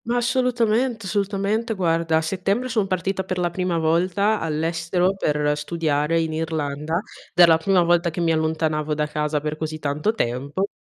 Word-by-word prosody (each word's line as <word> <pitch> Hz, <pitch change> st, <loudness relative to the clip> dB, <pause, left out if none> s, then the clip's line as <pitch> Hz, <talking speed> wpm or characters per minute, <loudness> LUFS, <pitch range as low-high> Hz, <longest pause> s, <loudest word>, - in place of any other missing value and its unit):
Ma 235 Hz, +2 st, -1 dB
assolutament 240 Hz, -1 st, +1 dB
assolutamente. 205 Hz, +3 st, -1 dB
Guarda, 165 Hz, -3 st, +1 dB
a -, -, +2 dB
settembre 195 Hz, +8 st, -1 dB
son 220 Hz, -5 st, 0 dB
partita 190 Hz, +1 st, -1 dB
per 185 Hz, -1 st, -4 dB
la 175 Hz, -1 st, 0 dB
prima 180 Hz, -1 st, -1 dB
volta 180 Hz, +6 st, +1 dB
all'estero 165 Hz, +3 st, 0 dB
per 150 Hz, -4 st, 0 dB
studiare 150 Hz, 0 st, 0 dB
in 160 Hz, -1 st, -1 dB
Irlanda, 155 Hz, -1 st, -2 dB
ed 175 Hz, -, -7 dB
era 175 Hz, -1 st, +8 dB
la 160 Hz, -, +6 dB
prima 180 Hz, +1 st, +3 dB
volta 175 Hz, 0 st, +2 dB
che 165 Hz, -, -6 dB
mi 170 Hz, -1 st, +2 dB
allontanavo 155 Hz, -1 st, 0 dB
da 150 Hz, 0 st, 0 dB
casa 150 Hz, 0 st, -1 dB
per 150 Hz, +1 st, -3 dB
così 155 Hz, 0 st, -4 dB
tanto 150 Hz, +7 st, -1 dB
tempo 140 Hz, -, -2 dB
170 Hz, 170 wpm, -22 LUFS, 155-195 Hz, -, era